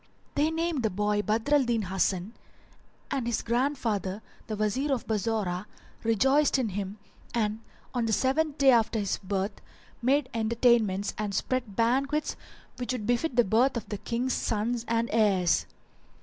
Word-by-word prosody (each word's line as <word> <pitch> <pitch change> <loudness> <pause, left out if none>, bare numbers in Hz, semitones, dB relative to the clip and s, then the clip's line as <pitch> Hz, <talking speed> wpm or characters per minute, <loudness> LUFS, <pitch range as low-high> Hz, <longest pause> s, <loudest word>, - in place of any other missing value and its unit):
They 295 +2 +2
named 325 -3 -1
the 220 - +1
boy 210 +2 0
Badr 220 +7 0
al 290 -2 +5
Din 235 -3 0
Hasan 190 +2 -1 0.8
and 260 -4 -1
his 235 - -1
grandfather, 230 -6 -1 0.2
the 215 - -3
Wazir 215 +8 0
of 260 -4 -1
Bassorah, 210 -3 -1 0.4
rejoiced 265 +7 +3
in 250 -4 0
him 200 +1 -4 0.4
and, 215 -2 0 0.3
on 240 -2 0
the - - 0
seventh 280 +6 +1
day 275 -1 +6
after 230 -1 +3
his 200 -3 -1
birth, 195 +1 -3 0.4
made 270 +3 +2
entertainments 225 -3 +2
and 205 -2 -2
spread 245 -1 -1
banquets 275 +7 +1 0.4
which 250 +1 -2
would 230 -5 -4
befit 245 +5 0
the 240 - +6
birth 235 +5 +2
of 235 - -5 0.2
Kings' 245 +2 -1
sons 230 +2 -1
and 230 0 +1
heirs. 195 -6 +3
230 Hz, 150 wpm, -28 LUFS, 210-255 Hz, 0.8 s, day